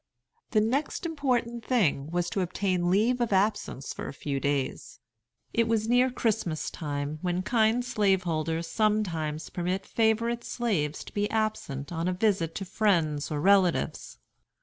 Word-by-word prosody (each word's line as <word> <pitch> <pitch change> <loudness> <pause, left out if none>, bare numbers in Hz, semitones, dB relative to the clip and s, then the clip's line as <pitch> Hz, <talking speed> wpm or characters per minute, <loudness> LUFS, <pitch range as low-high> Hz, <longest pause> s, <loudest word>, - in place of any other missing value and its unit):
The 215 - +3
next 270 +10 -1
important 250 -7 -1
thing 165 - +1
was 175 +1 -1
to 195 - 0
obtain 180 -1 0
leave 230 +7 +2
of 235 - 0
absence 195 -8 0
for - - -6
a - - -6
few 140 0 -3
days. 140 -1 -2 0.5
It 230 0 +2
was 225 -1 +1
near 245 +2 +4
Christmas 220 -10 -1
time, 145 -1 -4
when 180 0 -1
kind 230 +2 +2
slaveholders 175 -7 0
sometimes 165 -8 -1
permit 180 +2 -2
favorite 230 +1 +1
slaves 170 - -1
to - - -12
be 205 0 0
absent 215 -11 -2
on 165 0 -2
a 185 - +1
visit 180 -4 +1
to 195 - -4
friends 170 -7 +1
or 150 - -2
relatives. 190 -1 +2
195 Hz, 150 wpm, -28 LUFS, 160-225 Hz, 0.5 s, near